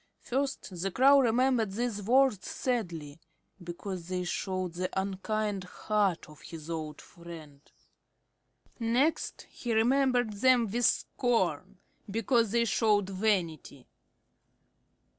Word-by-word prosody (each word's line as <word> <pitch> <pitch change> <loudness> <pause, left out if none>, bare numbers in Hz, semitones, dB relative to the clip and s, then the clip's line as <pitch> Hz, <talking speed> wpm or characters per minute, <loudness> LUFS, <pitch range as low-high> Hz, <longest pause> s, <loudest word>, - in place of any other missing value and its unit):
First 260 -9 -3
the 195 - 0
Crow 275 +7 +6
remembered 245 -3 +2
these 230 -1 -2
words 245 -1 +2
sadly, 170 - -3 0.4
because 175 0 -6
they 180 0 -2
showed 185 -1 -3
the 185 +1 -2
unkind 200 +1 -2
heart 200 -1 -1
of 150 -2 -15
his 160 -1 -9
old 155 -2 -5
friend. 160 -5 -12 1.2
Next 245 +7 0
he 240 -2 -5
remembered 245 -1 +2
them 245 +3 +4
with 235 +4 0
scorn, 190 - 0 0.3
because 230 +2 +1
they 235 +2 +2
showed 205 -2 +2
vanity. 180 - -1
205 Hz, 105 wpm, -30 LUFS, 180-240 Hz, 1.2 s, Crow